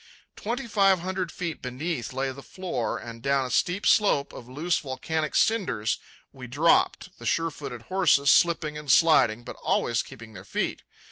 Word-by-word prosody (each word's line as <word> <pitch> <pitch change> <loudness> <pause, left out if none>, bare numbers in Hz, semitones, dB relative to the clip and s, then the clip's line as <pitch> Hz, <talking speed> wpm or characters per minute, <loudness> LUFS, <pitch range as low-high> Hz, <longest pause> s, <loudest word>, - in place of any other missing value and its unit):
Twenty 245 +5 -4
five 195 -5 +3
hundred 185 -1 -3
feet 170 -3 -5
beneath 125 0 -4
lay 135 +1 -2
the 140 +1 -10
floor, 170 -9 -4
and 115 -1 -9
down 140 +1 +1
a 125 - -6
steep 180 - 0
slope 170 -10 +3
of 120 - -11
loose 160 +7 0
volcanic 155 +3 -3
cinders 195 - +1 0.3
we 130 -2 -9
dropped, 150 +7 +1
the 120 - -10
sure 165 +9 +1
footed 125 -6 -8
horses 180 -6 +3
slipping 155 -3 +2
and 150 -3 -1
sliding, 125 -8 +4
but - - -9
always 120 0 0
keeping 115 -4 -12
their 95 -2 -10
feet. - - -3
145 Hz, 165 wpm, -26 LUFS, 125-175 Hz, 0.3 s, sliding